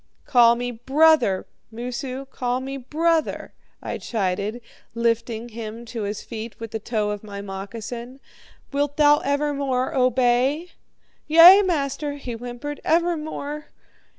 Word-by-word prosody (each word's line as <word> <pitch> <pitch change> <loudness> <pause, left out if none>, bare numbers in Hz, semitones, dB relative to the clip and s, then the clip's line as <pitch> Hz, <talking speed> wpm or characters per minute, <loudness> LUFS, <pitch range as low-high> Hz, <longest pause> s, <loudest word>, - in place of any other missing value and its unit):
"'Call 235 -2 +5
me 245 +1 -3
"brother," 265 -3 +3 0.3
Moosu 250 +3 -5
call 250 -2 -2
me 270 +1 -5
"brother,"' 315 +5 -1 0.3
I - - -4
chided, 205 +1 -2 0.4
lifting 230 0 -1
him 225 0 -7
to 230 -1 -6
his 205 0 -4
feet 225 -1 -8
with 225 -1 -7
the 220 - -3
toe 210 -1 -1
of 210 0 -5
my 200 -1 -8
moccasin. 225 +6 -7 0.5
'Wilt 285 0 -1
thou 295 0 +6
evermore 280 -2 -1
obey?' 255 +5 +2 0.6
"'Yea, 335 +5 +9
master,' 295 -5 -1
he 255 -4 -6
whimpered, 245 +5 -6
'evermore.' 315 -3 -1
250 Hz, 125 wpm, -23 LUFS, 230-290 Hz, 0.6 s, Yea